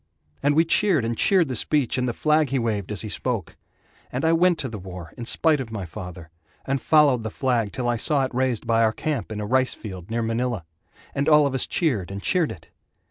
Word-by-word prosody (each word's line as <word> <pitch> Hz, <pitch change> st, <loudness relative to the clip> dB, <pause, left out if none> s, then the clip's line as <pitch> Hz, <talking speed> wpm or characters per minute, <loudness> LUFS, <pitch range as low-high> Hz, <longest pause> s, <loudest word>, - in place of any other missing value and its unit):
And 145 Hz, +1 st, +2 dB
we 165 Hz, +2 st, +4 dB
cheered 165 Hz, -, +2 dB
and 115 Hz, +1 st, -1 dB
cheered 185 Hz, -, +3 dB
the 130 Hz, -, -3 dB
speech 140 Hz, +1 st, +1 dB
and 125 Hz, -1 st, 0 dB
the -, -, +1 dB
flag 155 Hz, +1 st, +2 dB
he 135 Hz, -, 0 dB
waved 110 Hz, -5 st, -2 dB
As 105 Hz, -, -3 dB
he 110 Hz, -, -5 dB
spoke. 115 Hz, -4 st, -3 dB, 0.6 s
And 130 Hz, +5 st, -2 dB
I 165 Hz, -, +4 dB
went 175 Hz, +1 st, +4 dB
to 135 Hz, -, -3 dB
the 110 Hz, -4 st, -7 dB
war 90 Hz, -3 st, -9 dB
in 120 Hz, -, -7 dB
spite 155 Hz, 0 st, +3 dB
of 125 Hz, -, -6 dB
my 100 Hz, -4 st, -4 dB
father, 85 Hz, -1 st, -9 dB, 0.3 s
And 135 Hz, 0 st, -1 dB
followed 145 Hz, -6 st, +4 dB
the 110 Hz, -, -4 dB
flag 120 Hz, -3 st, 0 dB
till 125 Hz, -2 st, -3 dB
I 120 Hz, -1 st, +1 dB
saw 140 Hz, +3 st, +2 dB
it 130 Hz, -, -7 dB
raised 125 Hz, -2 st, 0 dB
By 115 Hz, -1 st, +2 dB
our 110 Hz, -1 st, +3 dB
camp 150 Hz, -4 st, -3 dB
in 105 Hz, -, -4 dB
a 105 Hz, -, -3 dB
rice 130 Hz, +4 st, +1 dB
field 95 Hz, -4 st, -9 dB
near 115 Hz, +1 st, -1 dB
Manila, 115 Hz, -4 st, -2 dB, 0.5 s
And 140 Hz, +2 st, 0 dB
all 150 Hz, -1 st, +6 dB
of 140 Hz, -, -1 dB
us 130 Hz, -, 0 dB
cheered 125 Hz, -, 0 dB
and 100 Hz, 0 st, -5 dB
cheered 170 Hz, -, +1 dB
it. 80 Hz, -2 st, -12 dB
125 Hz, 240 wpm, -24 LUFS, 110-145 Hz, 0.6 s, all